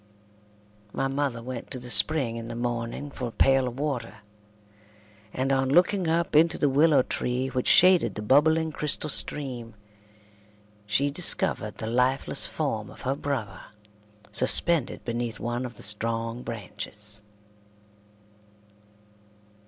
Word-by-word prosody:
My 135 Hz, -, -1 dB
mother 135 Hz, -4 st, -3 dB
went 125 Hz, -1 st, -7 dB
to 135 Hz, -, -6 dB
the 125 Hz, -1 st, -3 dB
spring 120 Hz, +2 st, +5 dB
in 115 Hz, 0 st, -7 dB
the 115 Hz, -, -7 dB
morning 120 Hz, +3 st, -4 dB
for 125 Hz, -, -5 dB
a -, -, -7 dB
pail 135 Hz, +2 st, +2 dB
of 125 Hz, +2 st, -7 dB
water, 120 Hz, -7 st, -5 dB, 1.1 s
and 130 Hz, +3 st, -2 dB
on 135 Hz, -1 st, 0 dB
looking 180 Hz, +4 st, +2 dB
up 165 Hz, -1 st, -1 dB
into 165 Hz, +2 st, +4 dB
the 145 Hz, -, +1 dB
willow 145 Hz, -1 st, +3 dB
tree 125 Hz, +2 st, -3 dB
which 130 Hz, -1 st, -3 dB
shaded 180 Hz, -, +4 dB
the 105 Hz, -, -6 dB
bubbling 160 Hz, +7 st, +2 dB
crystal 150 Hz, 0 st, 0 dB
stream, 125 Hz, -7 st, +1 dB, 1.1 s
she 140 Hz, +7 st, 0 dB
discovered 140 Hz, -, -1 dB
the -, -, -7 dB
lifeless 125 Hz, +4 st, +3 dB
form 115 Hz, -9 st, -4 dB
of -, -, -14 dB
her 135 Hz, +2 st, -2 dB
brother 140 Hz, -7 st, -5 dB, 0.7 s
suspended 145 Hz, +2 st, +2 dB
beneath 120 Hz, -2 st, -4 dB
one 120 Hz, +2 st, -4 dB
of 120 Hz, -, -14 dB
the -, -, -10 dB
strong 115 Hz, +2 st, 0 dB
branches. 105 Hz, -2 st, -8 dB
130 Hz, 130 wpm, -25 LUFS, 115-145 Hz, 1.1 s, spring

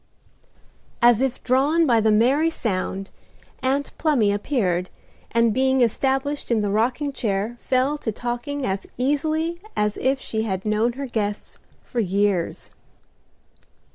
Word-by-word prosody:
As 240 Hz, -1 st, +5 dB
if 265 Hz, -1 st, -1 dB
drawn 285 Hz, +6 st, +3 dB
by 235 Hz, -5 st, +4 dB
the 220 Hz, 0 st, +3 dB
merry 260 Hz, +9 st, +3 dB
sound 195 Hz, -, -3 dB, 0.5 s
Aunt 270 Hz, +2 st, -1 dB
Plumy 270 Hz, -10 st, +3 dB
appeared, 200 Hz, -5 st, 0 dB, 0.4 s
and 230 Hz, -1 st, +2 dB
being 265 Hz, +1 st, +2 dB
established 270 Hz, +4 st, 0 dB
in 230 Hz, -3 st, +2 dB
the 205 Hz, -1 st, -1 dB
rocking 255 Hz, +7 st, 0 dB
chair 215 Hz, 0 st, -2 dB
fell 265 Hz, +3 st, +1 dB
to 220 Hz, -, -2 dB
talking 245 Hz, +5 st, -3 dB
as 195 Hz, -2 st, -2 dB
easily 310 Hz, +6 st, 0 dB
as 210 Hz, 0 st, 0 dB
if 265 Hz, +1 st, +1 dB
she 220 Hz, -4 st, -3 dB
had 190 Hz, -3 st, -3 dB
known 215 Hz, +3 st, +1 dB
her 275 Hz, +3 st, -5 dB
guests 210 Hz, -4 st, -3 dB, 0.2 s
for 245 Hz, -, -4 dB
years. 200 Hz, -3 st, 0 dB
240 Hz, 135 wpm, -23 LUFS, 210-275 Hz, 0.5 s, As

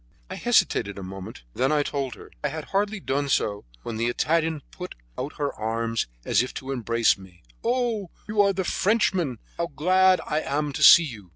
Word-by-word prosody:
I -, -, -4 dB
hesitated 100 Hz, 0 st, +2 dB
a 100 Hz, -, -6 dB
moment, 95 Hz, -6 st, -8 dB
and -, -, -7 dB
then 130 Hz, -, +3 dB
I 150 Hz, -1 st, +3 dB
told 135 Hz, -4 st, -3 dB
her. -, -, -14 dB
I -, -, +2 dB
had 155 Hz, +1 st, -6 dB
hardly 205 Hz, +2 st, +1 dB
done 140 Hz, -4 st, -1 dB
so 105 Hz, -, 0 dB, 0.2 s
when 115 Hz, -2 st, -5 dB
the 115 Hz, +1 st, 0 dB
Italian 160 Hz, +4 st, 0 dB
put 180 Hz, 0 st, -8 dB, 0.2 s
out 150 Hz, -, -4 dB
her 145 Hz, -1 st, -1 dB
arms 115 Hz, +1 st, -2 dB, 0.2 s
as -, -, +3 dB
if 125 Hz, -, -5 dB
to 135 Hz, 0 st, -5 dB
embrace 115 Hz, -4 st, +2 dB
me. 90 Hz, -2 st, -16 dB, 0.2 s
"Oh! 235 Hz, -5 st, 0 dB, 0.2 s
you 210 Hz, -1 st, +2 dB
are 200 Hz, -1 st, +4 dB
the 190 Hz, -1 st, -2 dB
Frenchman 190 Hz, -, +1 dB, 0.2 s
how 170 Hz, -, -1 dB
glad 185 Hz, +5 st, +3 dB
I 150 Hz, -, 0 dB
am 145 Hz, 0 st, -2 dB
to 155 Hz, -, -4 dB
see 170 Hz, +3 st, +10 dB
you! 110 Hz, -, -8 dB
145 Hz, 200 wpm, -25 LUFS, 115-185 Hz, 0.2 s, see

